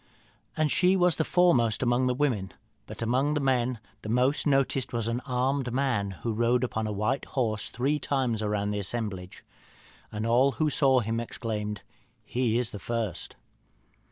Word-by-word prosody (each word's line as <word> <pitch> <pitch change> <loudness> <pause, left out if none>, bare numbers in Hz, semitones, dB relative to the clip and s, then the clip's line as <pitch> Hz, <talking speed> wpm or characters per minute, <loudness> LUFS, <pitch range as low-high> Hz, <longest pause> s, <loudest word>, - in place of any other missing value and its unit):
And 155 -2 +2
she 185 +1 +4
was 180 -2 +3
the 160 - +2
foremost 130 -12 +3
among 125 +1 +2
the 125 - +1
women; 120 -9 -1 0.3
but 110 +2 -6
among 130 +6 +1
the - - +1
men 130 -3 +1 0.2
the 105 - -7
most 125 +6 +2
noticed 135 -2 +1
was 115 -2 -1
an 115 +1 -1
armed 130 0 0
man, 125 -6 0 0.2
who 115 - 0
rode 120 +3 +2
upon 110 -3 -2
a - - -3
white 110 +6 -1
horse 110 -5 -1
three 140 +5 0
times 130 -6 -1
round 105 -1 -1
the 105 - -2
assemblage. 100 -3 -4 0.7
And 105 +1 -3
all 125 +4 +3
who 155 -2 0
saw 135 -3 +4
him 115 +1 -2
exclaimed, 105 -3 -4 0.4
'He 120 -2 0
is 120 -2 -1
the 105 - -7
first.' 115 -5 -3
120 Hz, 170 wpm, -28 LUFS, 110-135 Hz, 0.7 s, she